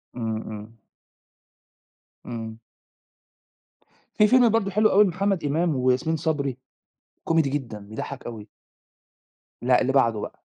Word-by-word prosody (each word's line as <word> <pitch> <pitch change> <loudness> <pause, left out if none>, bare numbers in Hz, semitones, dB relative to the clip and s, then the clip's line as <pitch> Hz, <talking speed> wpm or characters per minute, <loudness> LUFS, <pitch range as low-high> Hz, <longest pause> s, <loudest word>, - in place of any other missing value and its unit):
إمم، 110 -2 -3
إمم. 110 +1 -9 1.5
إمم. 110 -2 -6 1.6
في 210 - +5
فيلم 245 0 +5
برضه 210 -3 +1
حلو 215 +2 +3
أوي 205 +2 +6
لمحمد 195 -1 0
إمام 155 +2 0
وياسمين 130 +5 +1
صبري، 140 -5 -2 0.7
كوميدي 160 -4 +2
جدًا، 125 -7 -4
بيضَحّك 105 +2 -7
أوي. 110 -3 -8 1.1
لأ، - - +3
اللي - - 0
بعده - - +3
بقى. - - -8
140 Hz, 115 wpm, -24 LUFS, 115-190 Hz, 1.6 s, أوي